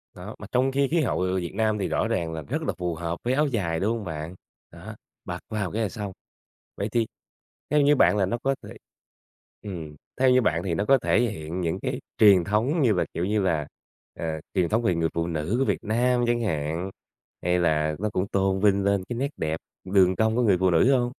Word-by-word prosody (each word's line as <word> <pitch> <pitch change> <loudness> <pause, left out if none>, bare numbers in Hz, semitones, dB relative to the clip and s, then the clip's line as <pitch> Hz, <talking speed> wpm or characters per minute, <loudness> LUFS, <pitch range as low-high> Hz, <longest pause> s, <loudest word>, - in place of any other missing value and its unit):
Đó, - - -8
mà - - -8
trong 130 +2 +2
khi 140 0 +2
khí 170 -1 +3
hậu, 120 - 0
ờ, 95 0 0
Việt 85 -2 -3
Nam 110 -1 +1
thì 95 - -1
rõ - - 0
ràng 80 -1 -1
là 80 - -4
rất 70 - -3
là - - -1
phù 90 -2 -2
hợp 85 +1 -4
với 125 +2 +1
áo 150 +2 +2
dài, 85 -10 -1
đúng 110 +4 0
hông 105 - -7
bạn? 80 +2 -5 0.4
Đó, - - -10 0.3
mặc - - -5
vào 105 -5 -2
cái 115 - -2
là 105 - 0
xong. 105 -4 -5 0.7
Vậy 100 +2 -2
thì 115 -2 +1 0.6
theo 150 0 +3
như 145 +1 +5
bạn 105 - +4
là 95 - +3
nó 120 +6 -2
có 135 0 +1
thể - - -10 0.9
ừm, 80 -7 -7 0.2
theo 130 -1 +5
như 125 0 +5
bạn 85 -4 +1
thì 90 -3 -1
nó 90 +6 0
có 135 0 +5
thể - - +2
hiện 90 -6 -3
những 85 +3 -1
cái 130 0 -3 0.2
truyền 100 -5 +7
thống 120 - +1
như 115 -5 +4
là, - - +1
kiểu 85 - -1
như 105 +1 +1
là, 80 -6 0 0.5
ờ, 85 - -3 0.3
truyền 90 -4 +1
thống 115 +2 +2
về 90 -6 +2
người 80 -1 +1
phụ 85 0 -1
nữ 80 +6 -2
của 135 - +2
Việt - - -1
Nam 120 +3 +1
chẳng 120 0 +1
hạn, 80 -1 -2 0.5
hay 90 +1 +2
là 80 -2 +1
nó 105 +1 -1
cũng 95 -1 -1
tôn 95 -1 +1
vinh 100 -1 +3
lên 100 -1 +1
cái 120 - -3
nét 140 +2 -1
đẹp 80 0 -2 0.3
đường 95 -1 +4
cong 110 0 +1
của 125 - +2
người 100 -6 +4
phụ 95 0 +2
nữ 105 +11 +4
hông? 120 0 -1
100 Hz, 240 wpm, -25 LUFS, 85-120 Hz, 0.9 s, truyền